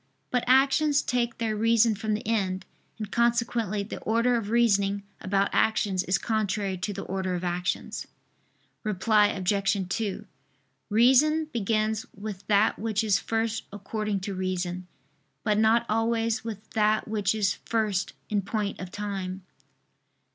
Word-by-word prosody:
But 250 -1 +1
actions 275 +3 +4
take 235 -1 -1
their 225 -2 -1
reason 230 +1 +4
from 215 +1 -1
the 210 - -6
end; 190 -4 0 0.3
and 215 -2 -6
consequently 235 -3 +1
the 200 - -7
order 230 +3 +2
of 220 -3 -2
reasoning 200 -4 +2 0.2
about 195 +1 0
actions 200 -4 +2
is 185 +1 +1
contrary 205 -3 -1
to 205 - -2
the 200 0 -5
order 190 -1 -2
of 175 - -4
actions. 175 0 -2 0.8
Reply 210 0 +3
Obj. 195 0 0
2: 205 0 -2 0.6
Reason 265 +8 +4
begins 220 -1 0
with 200 -1 -7
that 210 +1 +3
which 220 0 0
is 205 -3 +3
first 225 0 -2
according 205 0 -3
to 195 +1 -4
reason; 185 -1 -3 0.6
but 210 -1 +2
not 225 +2 +4
always 225 0 0
with 215 -2 -7
that 215 0 +2
which 210 -1 0
is 200 -3 0
first 215 -5 0
in 210 -1 0
point 205 +1 -3
of 185 - -6
time. 195 -2 -4
215 Hz, 140 wpm, -27 LUFS, 195-225 Hz, 0.8 s, actions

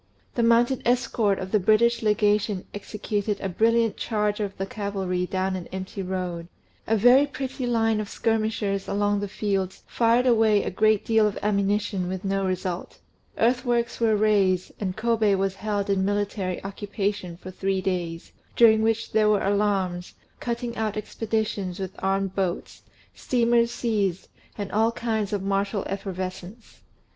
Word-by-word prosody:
The 240 - 0
mounted 235 +2 +3
escort 235 -4 +1
of 190 0 -6
the 215 - +3
British 225 +4 +3
Legation 210 -2 +1
executed 205 0 -3
a - - -3
brilliant 225 +4 +2
charge 210 -2 -1
of 200 -2 -3
cavalry 195 -3 -2
down 190 0 -1
an 180 -2 -6
empty 190 +1 -5
road; 180 -2 -4 0.4
a 225 - +2
very 250 +6 +6
pretty 265 -2 -4
line 225 -2 +2
of 205 - -6
skirmishers 215 -3 -1
along 205 0 +1
the 205 - -3
fields 195 -2 -2
fired 235 +2 +2
away 220 -4 +4
a - - -3
great 215 +2 +2
deal 220 -1 +4
of 205 - -3
ammunition 200 -2 0
with 190 +2 -4
no 195 0 0
result; 185 -1 -3 0.4
earthworks 240 0 +1
were 225 -2 +3
raised, 200 -4 +2
and 190 -2 -3
Kôbé 220 -3 +2
was 195 0 0
held 205 -1 -2
in 195 -1 +1
military 200 -2 -2
occupation 200 -2 -3
for 185 +1 -9
three 190 +1 -1
days, 175 -3 -3 0.2
during 220 -2 +6
which 225 0 0
there 215 -1 +3
were 210 -1 +2
alarms, 195 -3 0 0.2
cutting 235 0 -3
out 215 -2 -2
expeditions 215 -3 -2
with 190 -1 -4
armed 195 0 0
boats, 190 -2 -3 0.3
steamers 235 -1 +2
seized, 205 -7 -1 0.3
and 200 -2 -4
all 220 +2 +2
kinds 220 -3 -2
of 205 -2 -2
martial 200 +1 0
effervescence. 190 +2 -6
205 Hz, 150 wpm, -25 LUFS, 190-225 Hz, 0.4 s, very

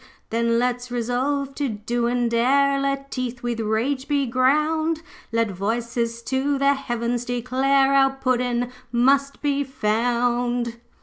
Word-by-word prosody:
'Then 230 +1 +1
let's 245 +1 -1
resolve 255 +4 -1
to 280 -1 -2
do 235 +3 -2
and 240 -1 0
dare. 275 +4 +3
Let 275 0 -2
teeth 250 -2 -4
with 240 -1 -2
rage 230 +5 -1
be 285 -2 +1
ground. 305 +6 +1 0.3
Let 230 -2 +1
voices 230 +4 -2
to 270 +4 0
the 275 +1 +3
heavens 240 -3 -2
declare 260 +3 +2
Our 270 -1 +4
Puddin' 250 -2 0 0.2
MUST 275 +4 +2
be 285 -1 +1
found.' 240 0 0
245 Hz, 130 wpm, -23 LUFS, 235-275 Hz, 0.3 s, Our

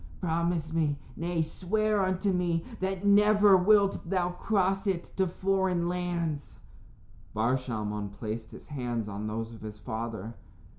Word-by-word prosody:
Promise 165 -2 0
me 155 -3 +1 0.2
nay, 170 0 0
swear 210 +5 0
unto 185 +1 +1
me 175 -2 0
that 190 +1 -2
never 205 0 +6
wilt 195 -1 +3
thou 180 -2 +1
cross 195 +1 0
it 185 -3 0
to 190 -1 +3
foreign 185 -1 +1
lands." 175 -4 -2 0.8
Bar 115 +4 +2
Shalmon 105 -5 -3
placed 110 +1 -5
his - - -12
hands 120 -6 -2
on 105 +1 -4
those 115 +1 -4
of 110 - -12
his 105 -1 -7
father. 110 0 -5
170 Hz, 140 wpm, -29 LUFS, 115-190 Hz, 0.8 s, never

